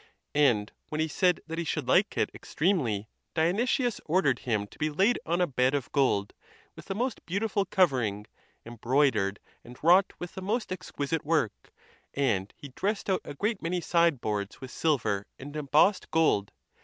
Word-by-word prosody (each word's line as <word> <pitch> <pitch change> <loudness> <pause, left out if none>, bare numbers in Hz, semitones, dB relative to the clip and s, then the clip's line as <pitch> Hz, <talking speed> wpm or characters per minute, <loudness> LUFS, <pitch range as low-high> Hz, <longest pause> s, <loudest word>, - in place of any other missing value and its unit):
And 120 -8 +3 0.2
when 155 - -3
he 160 - +2
said 180 +2 +2
that 165 +1 -5
he - - -1
should 160 - -3
like - - +3
it - - +1
extremely, 130 - -1 0.3
Dionysius 230 - +1
ordered 150 -7 +2
him 110 -4 -1
to - - -18
be 155 - +1
laid 195 +11 +2
on 170 +2 +1
a - - +5
bed 130 -2 +1
of 140 -4 -3
gold 125 -8 +1 0.4
with - - -12
the 195 - -4
most 245 +2 -2
beautiful 200 +2 0
covering, 125 - +1 0.4
embroidered 120 -3 +1 0.2
and 120 +1 -12
wrought 180 +4 +5
with 175 - -7
the 190 - -7
most 215 +4 -2
exquisite 165 -4 -3
work, 155 -9 -1 0.4
and 105 -9 0
he 145 - -10
dressed 200 +8 -2
out 185 - +1
a - - -8
great 210 +6 -1
many 175 +2 -1
sideboards 135 - 0
with 130 -1 -9
silver 115 -10 0
and 145 +2 -9
embossed 150 +7 +2
gold. 150 -11 +2
155 Hz, 170 wpm, -28 LUFS, 125-185 Hz, 0.4 s, a